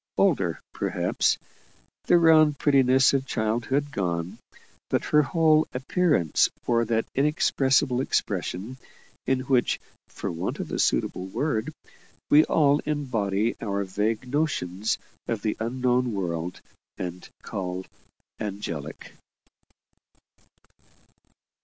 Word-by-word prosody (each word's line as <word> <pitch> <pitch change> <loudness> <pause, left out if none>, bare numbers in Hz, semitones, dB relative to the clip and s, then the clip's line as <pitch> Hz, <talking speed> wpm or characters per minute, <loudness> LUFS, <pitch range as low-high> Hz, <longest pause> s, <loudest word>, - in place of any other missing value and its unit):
Older, 115 - +2
perhaps; - - 0 0.7
the 175 - +5
round 155 -3 +5
prettiness 135 -2 +4
of 135 -1 0
childhood 120 +6 -1
gone 85 - -3 0.5
but - - 0
her 150 - +4
whole 155 +2 +3
appearance 135 - +2 0.2
wore 115 -1 +2
that 115 0 0
inexpressible 135 -2 +2
expression, 100 0 -2 0.5
in 130 -1 +1
which, 130 -2 +1 0.3
for - - -5
want 85 0 -3
of - - -5
a - - -2
suitable 90 - 0
word, 110 +1 -2 0.6
we 150 +1 +8
all 145 -2 +3
embody 115 -9 -1
our 100 -2 -1
vague 105 +6 -2
notions 115 - -1 0.3
of 115 -3 -2
the 110 - 0
unknown 125 +1 0
world, 90 -3 -3 0.4
and 90 0 -6
call 95 -1 -4 0.5
"angelic." 90 -8 -6
120 Hz, 105 wpm, -26 LUFS, 95-140 Hz, 0.7 s, we